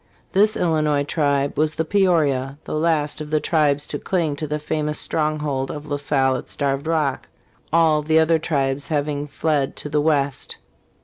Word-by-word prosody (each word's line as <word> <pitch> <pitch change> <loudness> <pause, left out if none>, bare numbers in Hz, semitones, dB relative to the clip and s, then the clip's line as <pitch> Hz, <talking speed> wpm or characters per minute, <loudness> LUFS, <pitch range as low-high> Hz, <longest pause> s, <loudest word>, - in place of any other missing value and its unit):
This 210 +3 +3
Illinois 155 -4 +1
tribe 140 -2 0
was 155 0 +1
the 160 - -1
Peorias, 155 -8 +2
the - - -6
last 155 -1 0
of 150 - -6
the 155 0 +2
tribes 145 -3 +1
to 145 - -5
cling 165 -6 -1
to 155 - -3
the 150 +1 -2
famous 150 0 -2
stronghold 150 -4 -1
ofrLa 150 -1 -4
Salle 135 -2 +1
at - - -9
Starved 140 +1 -2
Rock, 155 -5 0 0.4
all 160 -2 +4
the 155 +1 +2
other 160 0 +4
tribes 140 -3 -1
having 145 -1 -1
fled 145 -2 -1
to 150 - -7
the 150 0 +1
west. 145 -3 0
150 Hz, 170 wpm, -22 LUFS, 140-160 Hz, 0.4 s, all